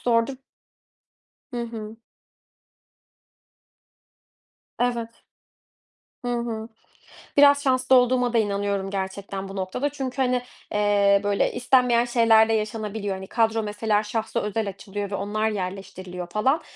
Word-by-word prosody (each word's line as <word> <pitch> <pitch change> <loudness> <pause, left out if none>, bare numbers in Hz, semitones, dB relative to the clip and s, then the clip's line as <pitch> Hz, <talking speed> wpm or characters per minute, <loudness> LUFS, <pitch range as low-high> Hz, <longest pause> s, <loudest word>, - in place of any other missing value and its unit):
zordur. 235 +2 +2 1.2
Hı 240 -1 -2
hı. 225 -1 -7 2.8
Evet. 240 -2 0 1.2
Hı 245 - -2
hı. 230 -2 -3 0.7
Biraz 285 0 +7
şanslı 260 -1 +3
olduğuma 250 -1 +3
da - - +3
inanıyorum 200 -2 0
gerçekten 195 0 -4
bu 195 - -8
noktada. 190 +9 -2
Çünkü 270 -2 -5
hani, 250 -1 +2 0.3
eee, 205 -1 +3
böyle, 205 0 +1
istenmeyen 245 -1 +3
şeyler 230 -2 +5
de - - +2
yaşanabiliyor. 215 -2 -2
Hani, 190 0 -8
kadro 225 -1 +1
mesela 210 0 0
şahsa 220 +1 -2
özel 210 0 -2
açılıyor 200 +1 -6
ve - - -1
onlar 215 +3 -1
yerleştiriliyor 185 -2 -5
falan. 260 - +1
220 Hz, 115 wpm, -24 LUFS, 200-240 Hz, 2.8 s, Biraz